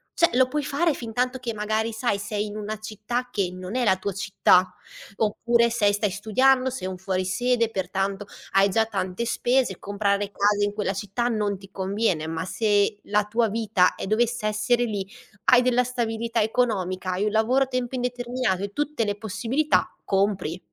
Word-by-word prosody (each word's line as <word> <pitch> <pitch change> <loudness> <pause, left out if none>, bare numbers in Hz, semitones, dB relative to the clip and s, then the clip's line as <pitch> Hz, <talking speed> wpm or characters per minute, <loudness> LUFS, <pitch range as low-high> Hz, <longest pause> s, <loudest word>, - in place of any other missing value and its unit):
cioè 340 - +3
lo 255 +1 +4
puoi 295 +2 -2
fare 295 +3 +1
fintanto 250 +2 -2
che, 240 -3 -4
magari 215 +1 -1
sai, 220 -2 0
sei 210 +1 -3
in 210 - -7
una 215 0 -5
città 220 +4 -4
che 195 -4 -1
non 185 +4 -7
è 255 - +1
la 190 -5 +3
tua 200 +1 -3
città. 185 -1 +3 0.4
Oppure 235 +2 +2
se 210 -3 +2
stai 205 0 0
studiando, 255 +7 +2
sei 245 -7 -5
un 185 -1 -5
fuori 185 0 -2
sede, 230 +5 +1
pertanto 195 0 -2 0.3
hai 195 +1 +5
già 220 +3 +2
tante 190 +1 -3
spese. 240 -4 +1
Comprare 200 0 -1
case 205 0 +2
in 205 - -3
quella 205 -2 -1
città 205 +5 -2
non 210 -4 -1
ti 195 0 -14
conviene. 195 -3 -1
Ma 165 +2 -3
se 205 +1 +1
la 210 0 +1
tua 225 +1 +1
vita 210 -4 +2
e - - -6
dovesse 230 +1 +1
essere 215 +3 +1
lì, 200 -4 -3 0.4
hai 250 -1 +7
della 250 0 +3
stabilità 230 -2 -1
economica, 195 -5 0
hai 185 +3 -1
un 210 - 0
lavoro 245 +5 +3
a - - -18
tempo 255 -1 -3
indeterminato 245 -5 -1
e 200 0 -5
tutte 295 -6 -1
le 205 - -1
possibilità: 235 +8 0
compri! 195 -4 0
215 Hz, 180 wpm, -25 LUFS, 195-240 Hz, 0.4 s, hai